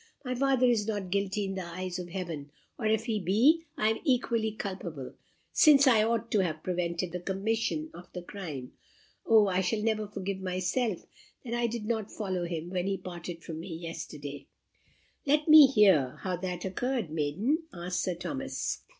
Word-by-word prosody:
My 255 - -1
father 265 0 +3
is 230 -4 +2
not 205 -4 -3
guilty 200 +1 0
in 195 - -3
the 190 -1 -4
eyes 180 +1 -5
of 175 -1 -6
Heaven; 165 -5 -5 0.3
or 220 - 0
if 220 0 +1
he 220 -3 0
be, 240 - +3
I 215 - +3
am 220 - 0
equally 235 -6 +1
culpable, 185 -10 -6 0.4
since 290 -3 +7
I 235 -5 +6
ought 230 +1 0
to 210 - +3
have 160 -5 -1
prevented 175 -1 -2
the 180 - -3
commission 225 - -1
of 175 - -12
the 180 - -7
crime. 160 -10 -7 0.6
O, 220 -2 +6
I 185 -1 +1
shall 210 +3 -1
never 215 -1 0
forgive 195 -1 -4
myself 185 +3 -1 0.4
that 235 - -4
I 240 0 +1
did 230 -2 -4
not 220 -2 -2
follow 185 -4 -2
him 170 0 -4
when 185 0 -1
he 195 -1 0
parted 175 -2 -7
from 160 -1 -6
me 170 0 -6
yesterday!" 145 -4 -7 0.8
"Let 295 +2 +3
me 305 -2 +10
hear 190 - +4
how 185 -2 -1
that 180 0 -4
occurred, 230 - -2
maiden?" 165 - 0
asked 180 -2 -3
Sir 180 - -1
Thomas. 270 +10 -3
195 Hz, 180 wpm, -29 LUFS, 175-225 Hz, 0.8 s, me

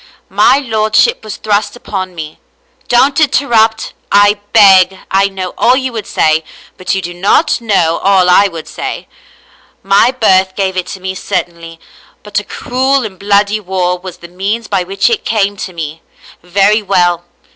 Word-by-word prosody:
My - - +4
lordship 225 - +1
was 215 -2 -7
thrust 205 0 -1
upon 185 -6 -6
me. 155 -2 -8 0.5
Don't 265 +4 +2
interrupt, 235 -7 +1 0.2
I 205 +1 +4
beg, 190 -3 +5
I 195 +1 +3
know 190 -2 -6
all 250 +2 +4
you 260 -2 -3
would 220 -2 -6
say, 155 +1 +1 0.3
but 185 +1 -3
you 190 - -3
do 175 +1 -6
not 200 - +1
know 175 -7 +1
all 190 -2 +3
I 190 +3 +5
would 165 -4 -9
say - - -6 0.4
— - - -32 0.2
My 240 - +5
birth 190 -7 +2
gave 190 -1 -1
it 185 -1 -3
to 190 - -7
me 190 0 -5
certainly, 170 -2 -5 0.4
but 210 -1 -2
a - - -8
cruel 260 +5 -1
and 190 -4 -9
bloody 205 +1 +1
war 185 -2 -1
was 185 -1 -9
the 170 - -12
means 200 +6 -4
by 195 -2 0
which 195 +2 -1
it 460 -3 0
came 205 -2 0
to 185 - -6
me. 160 -2 -7 0.4
Very 200 +5 +2
well. 175 -3 +1
195 Hz, 170 wpm, -12 LUFS, 180-220 Hz, 0.5 s, beg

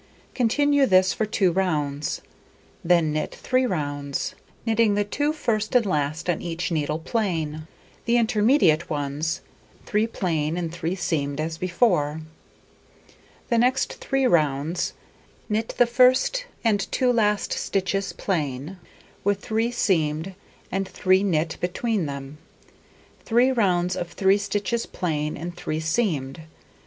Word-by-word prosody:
Continue 285 +3 +3
this 185 -1 +4
for 220 - -1
2 195 -3 +2
rounds; 150 -6 -1 0.6
then 170 -2 +3
knit 155 - -2
3 255 0 +1
rounds, 145 - -3 0.3
knitting 225 -2 +3
the 205 - +2
2 290 +9 -1
first 230 -8 -1
and 245 -3 +5
last 155 -2 -1
on 175 -3 0
each 170 +1 -3
needle 150 -1 0
plain; 160 -5 -2 0.4
the 235 +1 +3
intermediate 215 - +3
ones, 145 +2 -2 0.4
3 215 +2 +1
plain 165 -7 -1
and 170 -2 -3
3 170 +1 -2
seamed 145 -5 -2
as 160 +1 -3
before. 175 -5 +1 1.3
The 235 -2 +3
next 255 +3 +2
3 270 -1 0
rounds: 155 - +1 0.5
Knit 220 +1 -2
the 245 - +6
1st 255 - +3 0.2
and 205 -4 +1
2 250 -1 +2
last 210 -3 +1
stitches 195 0 -1
plain, 155 -1 -3 0.4
with 200 0 +1
3 225 0 0
seamed 170 -6 0 0.4
and 195 0 -1
3 185 0 +2
knit 165 -4 0
between 190 0 -1
them. 140 +1 -7 0.8
Three 245 +3 +3
rounds 180 -7 +1
of 175 0 -4
3 195 +1 +3
stitches 205 +3 -2
plain 155 -4 -2
and 175 +1 -6
3 155 -3 -3
seamed. 160 - -1
185 Hz, 130 wpm, -24 LUFS, 155-225 Hz, 1.3 s, the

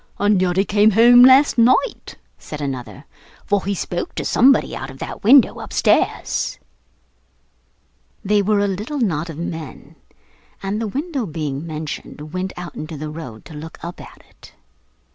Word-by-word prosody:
'And 205 -2 +2
yet 180 -1 0
he 195 - +3
came 210 +1 +4
home 235 +3 +6
last 260 0 +6
night,' 255 - +2 0.2
said 150 - -8
another; 135 0 -6 0.4
'for 205 -1 0
he 200 0 -1
spoke 175 -1 -4
to - - -4
somebody 270 +3 +3
out - - -6
of - - -11
that - - -7
window 255 +5 +5
upstairs.' - - 0 1.7
They 205 +1 +3
were 205 +1 +1
a 205 - +1
little 210 +10 -4
knot 170 - -1
of 160 - -8
men, 160 -3 -7 0.7
and, 200 +3 -2
the 225 - -2
window 280 - -3
being 155 -2 -4
mentioned, 155 -1 -7
went 185 +1 -3
out 175 -1 -7
into 155 0 -7
the 150 +1 -6
road 130 -9 -9
to - - -12
look 155 +2 -9
up 170 +1 -7
at - - -14
it. - - -18
185 Hz, 160 wpm, -20 LUFS, 155-220 Hz, 1.7 s, home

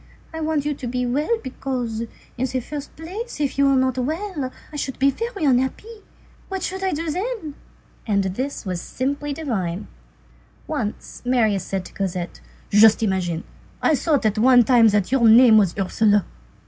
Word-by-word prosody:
I 320 - -5
want 310 -2 0
you 295 - 0
to 265 -3 -7
be 250 +1 -1
well, 295 - 0
because, 250 -4 -3 0.3
in 255 +2 -1
the 255 0 -2
first 285 +3 -7
place, 375 +7 -7
if 280 -2 -1
you 280 - +5
were 275 - +4
not 260 -1 +1
well, 310 0 -3 0.2
I - - -7
should 275 -2 -3
be 275 +1 +3
very 455 - -4
unhappy. 275 - 0 0.5
What 385 -2 -4
should 380 +1 -3
I 380 - +1
do 320 0 -2
then?" 385 -3 -4 0.5
And 200 -2 +2
this 245 +8 -3
was 180 -2 -3
simply 285 +3 -3
divine. 215 - -3 0.8
Once 235 -9 -5
Marius 225 -6 +1
said 190 -2 -3
to - - -12
Cosette:— 180 -3 -4 0.3
"Just 220 +2 +6
imagine, 185 -5 -1 0.4
I - - +2
thought 285 -2 +1
at 215 0 +1
one 245 +1 +6
time 235 -1 +5
that 205 -1 +1
your 255 -4 +4
name 225 -1 +8
was 195 -4 +1
Ursule." 205 +1 +2
260 Hz, 175 wpm, -22 LUFS, 215-300 Hz, 0.8 s, name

